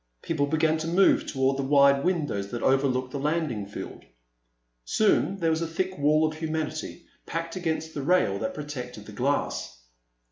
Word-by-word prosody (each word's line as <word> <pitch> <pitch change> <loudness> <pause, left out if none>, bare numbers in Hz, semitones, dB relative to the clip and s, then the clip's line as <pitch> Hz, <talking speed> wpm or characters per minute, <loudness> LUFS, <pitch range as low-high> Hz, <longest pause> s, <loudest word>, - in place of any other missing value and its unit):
People 145 -4 0
began 160 +1 +2
to 160 - -3
move 185 +4 +4
toward 135 0 +1
the - - 0
wide 140 0 +4
windows 145 - -1
that 120 - -5
overlooked 130 -1 +2
the 140 - -4
landing 145 -8 -1
field. 100 - -8 0.8
Soon 200 - +2
there 165 -3 +1
was 160 +1 0
a 165 - -1
thick 185 +3 -2
wall 155 +2 +4
of 155 0 -3
humanity 160 +1 -4 0.2
packed 165 0 -4
against 160 -3 -2
the 145 - -4
rail 140 - +2
that 110 - -3
protected 125 -7 -7
the 110 - -10
glass. 125 - -2
150 Hz, 170 wpm, -26 LUFS, 135-165 Hz, 0.8 s, move